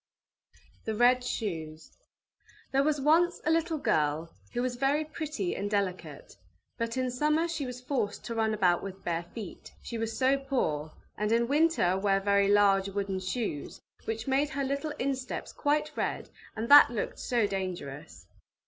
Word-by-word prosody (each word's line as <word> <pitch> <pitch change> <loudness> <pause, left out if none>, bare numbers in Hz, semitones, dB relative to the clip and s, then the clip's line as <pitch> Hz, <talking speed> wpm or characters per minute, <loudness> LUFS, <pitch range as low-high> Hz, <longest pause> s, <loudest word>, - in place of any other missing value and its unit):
THE 220 - -2
RED 245 +2 +4
SHOES 160 -10 -4 0.8
There 270 - +3
was 295 +1 +1
once 330 +5 +3
a 315 - +3
little 330 0 +1
girl 160 - 0 0.2
who 245 0 -1
was 255 -1 -1
very 275 +4 +1
pretty 305 - -3
and 200 +1 -3
delicate, 185 - -3 0.4
but 230 +1 -2
in 255 -1 0
summer 300 +6 +1
she 310 -5 -3
was 250 0 -7
forced 250 -6 -2
to 235 - -4
run 220 -1 +1
about 180 -4 +3
with 195 0 -8
bare 170 0 -2
feet, 215 -6 -8
she 235 - -5
was 225 0 -3
so 270 +1 +3
poor, 160 - -1 0.3
and 210 +1 0
in 235 +1 +3
winter 295 - +3
wear 195 0 +2
very 200 0 +3
large 200 -1 +4
wooden 195 -1 -2
shoes, 185 - -4 0.3
which 225 0 -3
made 275 +2 +2
her 280 -2 -2
little 280 +3 -2
insteps 260 -1 -3
quite 300 +1 0
red, - - -3 0.2
and 225 +2 -3
that 290 -1 +9
looked 230 -3 -4
so 235 -3 +1
dangerous! 155 - -5
230 Hz, 165 wpm, -29 LUFS, 195-275 Hz, 0.8 s, that